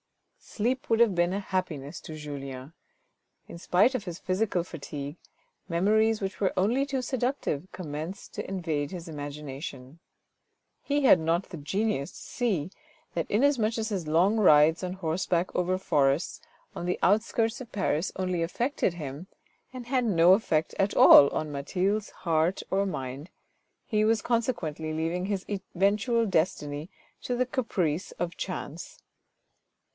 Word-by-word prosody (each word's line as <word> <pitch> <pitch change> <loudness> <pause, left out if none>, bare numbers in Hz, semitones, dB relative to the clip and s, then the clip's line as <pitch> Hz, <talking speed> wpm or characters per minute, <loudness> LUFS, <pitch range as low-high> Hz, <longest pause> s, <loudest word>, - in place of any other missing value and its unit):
Sleep 255 +6 -2
would 225 - +3
have 235 -4 +5
been 175 0 +2
a 195 - -1
happiness 180 -8 -3
to 155 - -8
Julien. 140 -2 -7 0.7
In 170 - -9
spite 190 +9 +3
of 240 -6 -3
his 175 -2 -5
physical 185 -1 0
fatigue, 145 -3 -7 0.5
memories 215 +6 +3
which 195 0 -5
were 195 - +2
only 240 +9 +2
too 270 -2 -2
seductive 245 - -2
commenced 160 +1 -6
to - - -5
invade 160 -6 -2
his 175 -2 -7
imagination. 145 -1 -7 0.8
He 285 0 0
had 220 -9 +7
not 165 +3 0
the 175 - -7
genius 160 -1 -1
to - - -12
see 190 - -2 0.4
that, 165 -2 -2
inasmuch 235 -1 +2
as 220 0 -2
his 185 -7 -3
long 180 +8 +3
rides 160 -4 +5
on 180 0 -2
horseback 175 0 -1
over 180 +1 +1
forests 145 -4 +1 0.3
on 175 - -4
the 180 - 0
outskirts 225 +4 +2
of 245 - -10
Paris 185 -4 0
only 185 -2 -1
affected 190 - -1
him, 150 +2 -7 0.4
and 255 -2 -8
had 255 0 +1
no 180 -5 +5
affect 160 -6 +1
at 195 +1 +1
all 140 - +9
on 155 -1 -3
Mathilde's 185 +9 -1
heart 165 +1 0
or 195 +1 +2
mind, 135 -1 -5 0.6
he 215 -2 +1
was 220 +1 +2
consequently 170 - -1
leaving 165 +4 -1
his 200 -2 -2
eventual 205 +4 +1
destiny 160 -4 -1 0.3
to 245 - -2
the 255 +1 +1
caprice 190 - -1
of 175 0 -4
chance. 170 -3 -6
185 Hz, 145 wpm, -28 LUFS, 155-215 Hz, 0.8 s, all